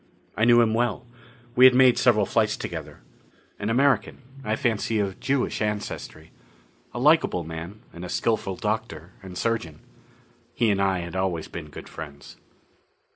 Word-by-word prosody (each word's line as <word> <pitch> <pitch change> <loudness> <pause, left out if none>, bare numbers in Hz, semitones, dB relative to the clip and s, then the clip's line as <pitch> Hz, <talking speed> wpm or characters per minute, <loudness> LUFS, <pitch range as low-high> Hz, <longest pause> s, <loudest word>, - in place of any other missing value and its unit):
I 110 - +2
knew 120 0 +6
him 110 -2 +2
well: 120 -2 0 0.5
we 125 - +7
had 130 -1 +8
made 130 -1 +5
several 110 -5 +4
flights - - +1
together. - - -7 0.6
An 100 - -2
American 135 +2 +1 0.2
I 110 -2 0
fancy 110 -1 0
of 100 -2 -2
Jewish 135 -4 -1
ancestry. 105 -6 -4 0.6
A - - -8
likable 145 - +3
man, 80 +6 -8
and 85 - -9
a 90 - -6
skillful 110 -4 -1
doctor 105 -5 -4
and 95 -2 -9
surgeon. 90 -10 -2 0.8
He 115 -3 +2
and 100 -1 0
I 95 -2 +1
had 85 +1 -7
always 95 -4 -1
been 80 -3 -8
good - - -10
friends. 75 -2 -10
105 Hz, 155 wpm, -25 LUFS, 90-120 Hz, 0.8 s, had